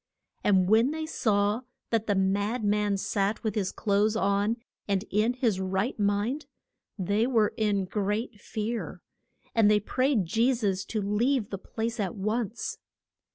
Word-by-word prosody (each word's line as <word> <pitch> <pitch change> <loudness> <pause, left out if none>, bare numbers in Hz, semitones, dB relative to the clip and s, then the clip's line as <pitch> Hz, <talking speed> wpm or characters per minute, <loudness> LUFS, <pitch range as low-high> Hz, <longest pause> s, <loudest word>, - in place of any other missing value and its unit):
And 190 -3 +4
when 225 +5 +5
they 315 +1 -3
saw 210 -6 +1 0.3
that 225 -1 +1
the 205 - +2
mad 200 +5 +1
man 205 -1 +2
sat 200 +1 -1
with 220 -3 0
his 200 -3 -1
clothes 210 +1 +1
on 205 +1 +1 0.3
and 200 0 0
in 215 +4 +2
his 235 -7 0
right 190 +6 -1
mind, 205 +8 0 0.5
they 205 +4 +1
were 225 -5 +2
in 205 -3 +1
great 210 +3 -2
fear. 225 +2 -4 0.5
And 225 -3 +5
they 210 0 +5
prayed 255 0 +1
Je 230 +8 +2
sus 195 -4 -1
to 215 -3 -2
leave 220 +3 +1
the 195 - -4
place 225 +4 -4
at 195 -4 -1
once. 215 +2 -2
210 Hz, 155 wpm, -28 LUFS, 200-230 Hz, 0.5 s, when